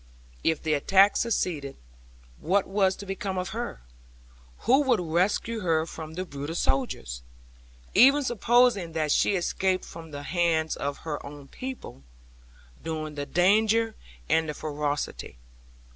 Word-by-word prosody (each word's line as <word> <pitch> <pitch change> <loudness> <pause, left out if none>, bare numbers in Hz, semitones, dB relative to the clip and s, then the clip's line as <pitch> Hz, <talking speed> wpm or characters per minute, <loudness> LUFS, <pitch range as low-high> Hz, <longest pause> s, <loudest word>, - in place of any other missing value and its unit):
If 160 -2 +1
the 155 -1 +1
attack 195 +7 +4
succeeded, 160 -11 -1 0.6
what 190 +4 +1
was 190 -1 +1
to 200 - -9
become 195 0 -4
of 185 +1 -2
her? 235 - -5 0.8
Who 265 +4 +4
would 260 -5 +2
rescue 180 +7 0
her 165 -5 +1
from 160 -1 -8
the 185 +1 -3
brutal 145 0 -6
soldiers, 65 - -1 0.7
even 275 +4 +6
supposing 240 -6 +2
that 155 -2 0
she 200 - +3
escaped 185 +1 0
from 165 -1 -10
the 145 -1 -7
hands 165 -1 +1
of 140 0 -4
her 150 -2 -4
own 140 -1 -10
people, 260 - -8 0.8
during 155 -1 -4
the 145 -1 -5
danger 220 +7 +3 0.3
and 160 - +1
ferocity? 145 - -3
175 Hz, 130 wpm, -27 LUFS, 155-205 Hz, 0.8 s, even